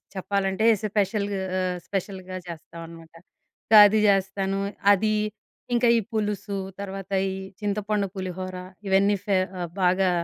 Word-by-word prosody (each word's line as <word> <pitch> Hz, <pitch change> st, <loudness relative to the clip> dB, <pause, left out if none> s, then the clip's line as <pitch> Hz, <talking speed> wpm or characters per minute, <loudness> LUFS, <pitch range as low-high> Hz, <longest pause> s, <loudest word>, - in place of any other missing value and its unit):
చెప్పాలంటే 195 Hz, +2 st, -1 dB, 0.2 s
స్పెషల్ 205 Hz, 0 st, 0 dB, 0.3 s
ఆహ్, 185 Hz, -1 st, -1 dB
స్పెషల్‌గ 190 Hz, -1 st, -4 dB, 0.2 s
చేస్తామన్నమాట. 165 Hz, 0 st, -10 dB, 0.6 s
గాది 210 Hz, 0 st, +8 dB
చేస్తాను 195 Hz, 0 st, +1 dB, 0.3 s
అది 215 Hz, +2 st, +2 dB, 0.6 s
ఇంకా 240 Hz, 0 st, +3 dB
ఈ -, -, +2 dB
పులుసు, 210 Hz, -2 st, -2 dB, 0.2 s
తర్వాత 195 Hz, -1 st, -6 dB, 0.2 s
ఈ -, -, -3 dB, 0.3 s
చింతపండు 210 Hz, 0 st, -1 dB
పులిహోర, 185 Hz, 0 st, -5 dB, 0.3 s
ఇవన్నీ 200 Hz, +1 st, +3 dB
ఫేవ 185 Hz, -2 st, 0 dB, 0.2 s
బాగా 185 Hz, +1 st, +3 dB
195 Hz, 105 wpm, -25 LUFS, 185-205 Hz, 0.6 s, గాది